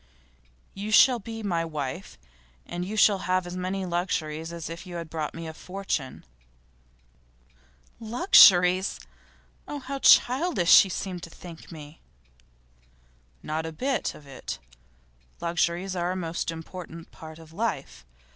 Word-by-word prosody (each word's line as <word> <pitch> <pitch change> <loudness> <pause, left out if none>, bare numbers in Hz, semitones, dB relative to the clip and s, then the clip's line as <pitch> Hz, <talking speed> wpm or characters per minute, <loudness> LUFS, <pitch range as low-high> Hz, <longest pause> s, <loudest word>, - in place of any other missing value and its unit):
You 200 +2 -6
shall 245 +3 +6
be 225 +1 -8
my 170 -5 0
wife, 155 +2 -5 0.5
and 175 0 -5
you 205 +4 -5
shall 205 -2 +5
have 185 0 +2
as 175 0 -7
many 185 +1 -3
luxuries 165 -3 -2
as 170 -1 -6
if 170 +3 -8
you 175 - -8
had 170 -2 -6
brought 155 -2 -4
me 165 0 -7
a 160 - -6
fortune.' 180 - -5 1.7
'Luxuries! 195 - +5 0.7
Oh, 295 - -5
how 275 0 -6
childish 255 - +6
you 195 - -6
seem 185 0 -4
to 170 - -10
think 165 0 -12
me!' 150 -1 -11 1.4
'Not 160 +1 -3
a - - -5
bit 260 - -2
of 150 - -15
it. 135 -2 -7 0.8
Luxuries 175 +2 -1
are 175 0 -1
a - - -5
most 170 -3 -3
important 165 0 -8
part 160 -1 -11
of 160 -1 -15
life. 195 -8 -3
175 Hz, 135 wpm, -26 LUFS, 165-195 Hz, 1.7 s, shall